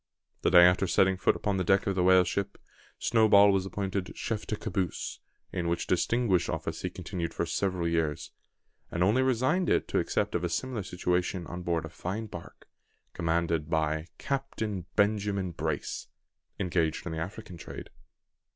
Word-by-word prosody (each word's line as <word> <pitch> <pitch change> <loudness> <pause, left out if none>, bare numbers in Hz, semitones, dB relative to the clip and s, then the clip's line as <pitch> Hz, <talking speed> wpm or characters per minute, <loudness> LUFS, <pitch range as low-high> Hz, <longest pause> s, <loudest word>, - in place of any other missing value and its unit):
The - - +3
day 90 - +8
after 90 +2 +5
setting 95 +2 +3
foot 90 - +2
upon 100 -2 -1
the 95 - +1
deck 95 +3 +3
of 100 - +1
the 95 - 0
whale 90 0 +6
ship, 100 +2 -3 0.4
Snowball 105 -3 +5
was 95 -1 0
appointed 95 -1 -3
chef 110 -2 -3
de 105 - -1
caboose, 95 -5 -3 0.3
in 85 -2 -1
which 85 0 -1
distinguished 95 0 +1
office - - -3
he - - -2
continued 85 -2 -5
for - - 0
several 90 0 -1
years; 80 -3 -1 0.6
and 85 - 0
only 110 +8 +3
resigned 130 +8 +2
it - - +2
to - - +1
accept - - -1
of 90 - -1
a 85 - 0
similar 125 +4 -2
situation 90 -1 -1
on 90 +2 -6
board 85 -2 -1
a - - -7
fine 95 +7 -4
bark, 85 -5 -11 0.5
commanded 85 -2 0
by 80 0 0
Captain 110 -9 -3
Benjamin 100 -3 +1
Brace, - - -3 0.5
engaged 85 -3 0
in 85 - -4
the 80 - -3
African 90 +1 -6
trade. - - -9
95 Hz, 170 wpm, -29 LUFS, 85-105 Hz, 0.6 s, day